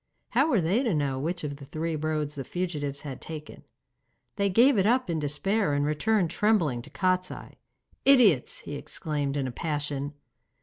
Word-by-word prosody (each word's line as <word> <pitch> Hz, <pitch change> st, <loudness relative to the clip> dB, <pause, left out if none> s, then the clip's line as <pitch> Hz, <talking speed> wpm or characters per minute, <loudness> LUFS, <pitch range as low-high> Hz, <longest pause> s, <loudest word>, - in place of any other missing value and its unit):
How 275 Hz, +6 st, +3 dB
were 230 Hz, -, +3 dB
they 185 Hz, +9 st, +2 dB
to 230 Hz, -10 st, +1 dB
know 140 Hz, -3 st, 0 dB
which 170 Hz, +4 st, -3 dB
of 145 Hz, -1 st, -4 dB
the 140 Hz, -, -11 dB
three 160 Hz, +3 st, -3 dB
roads 155 Hz, -1 st, -2 dB
the 140 Hz, -, -5 dB
fugitives 145 Hz, -4 st, -3 dB
had 135 Hz, -4 st, -7 dB
taken? 155 Hz, -1 st, -8 dB, 0.7 s
They 200 Hz, -1 st, +1 dB
gave 235 Hz, +4 st, +5 dB
it 195 Hz, -, +3 dB
up 245 Hz, -4 st, +2 dB
in 160 Hz, -, -1 dB
despair 150 Hz, +5 st, 0 dB
and 145 Hz, 0 st, +1 dB
returned 200 Hz, +9 st, +1 dB
in -, -, -7 dB
trembling 175 Hz, -, +2 dB
to 140 Hz, -, -12 dB
Kostiei. 185 Hz, +1 st, -2 dB, 0.4 s
'Idiots!' 230 Hz, -, +5 dB
he -, -, -7 dB
exclaimed, 145 Hz, -1 st, -3 dB
in 135 Hz, -, 0 dB
a 130 Hz, -, -3 dB
passion. 145 Hz, 0 st, -3 dB
155 Hz, 180 wpm, -27 LUFS, 145-195 Hz, 0.7 s, gave